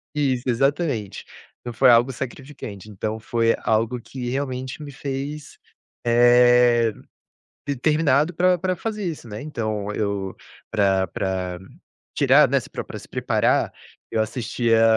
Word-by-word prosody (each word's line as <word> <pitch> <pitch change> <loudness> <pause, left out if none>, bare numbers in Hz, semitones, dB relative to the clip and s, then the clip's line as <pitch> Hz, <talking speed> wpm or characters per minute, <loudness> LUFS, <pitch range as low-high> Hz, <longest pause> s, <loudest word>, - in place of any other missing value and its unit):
Isso, 135 -4 0
exatamente. 135 - 0 0.4
Então 120 - -6
foi 130 +3 +5
algo 120 +3 +5
sacrificante, 130 -5 -8
então 110 +2 -4
foi 115 +1 +1
algo 115 +3 +1
que 125 +1 -6
realmente 130 +1 -3
me 145 - -8
fez, 140 +2 -6 0.5
eh, 120 -1 +5 0.7
determinado 150 +2 +2
para 180 +2 +3
para 185 +1 -1
fazer 215 +2 -4
isso, 155 -9 -5
né. 105 +1 -6
Então 110 -8 -3
eu 100 -2 -2 0.4
para 95 -3 +2
para 90 0 -3 0.6
tirar, - - +5
né, - - +3
se - - -12
pre - - -5
para - - -20
para - - -7
se - - -13
preparar, - - +1 0.4
eu 110 - 0
assistia 115 0 +1
120 Hz, 135 wpm, -23 LUFS, 110-140 Hz, 0.7 s, foi